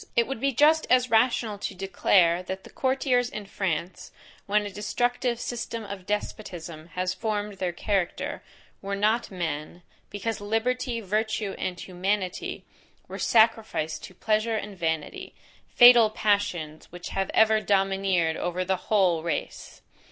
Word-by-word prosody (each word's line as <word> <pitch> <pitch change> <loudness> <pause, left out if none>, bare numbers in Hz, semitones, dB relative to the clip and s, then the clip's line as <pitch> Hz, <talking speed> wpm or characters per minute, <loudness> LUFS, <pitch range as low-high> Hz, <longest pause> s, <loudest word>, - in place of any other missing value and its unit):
It 235 - +4
would 270 -1 -5
be 275 +3 +1
just 305 +5 +4
as 255 -1 +3
rational 225 -2 +2
to 195 - -4
declare, 180 -2 +3
that 190 +1 -6
the - - -14
courtiers 260 -2 +1
in 210 -3 -7
France, 185 -3 -3 0.4
when 210 +1 +2
a 205 - -5
destructive 245 +4 -1
system 230 -2 -4
of 200 -3 -8
despotism 175 -6 -5
had 180 +1 -2
formed 205 0 -3
their 180 -2 -1
character, 185 0 -2 0.4
were 200 0 -3
not 215 +4 +1
men, 170 -2 -5 0.3
because 210 +1 -4
liberty, 230 +3 -1
virtue, 215 0 -1
and 180 -1 -3
humanity, 185 +1 -3 0.4
were - - -7
sacrificed 220 -9 +2
to 185 - -14
pleasure 220 +3 0
and 210 -1 -5
vanity. 160 -3 -3 0.3
Fatal 240 -2 +8
passions, 200 -8 -1
which 175 0 -8
have 195 0 -2
ever 220 0 +5
domineered 195 -5 +1
over 180 +1 -2
the 190 0 0
WHOLE 185 -5 +2
race! 165 -2 -5
205 Hz, 140 wpm, -26 LUFS, 180-225 Hz, 0.4 s, Fatal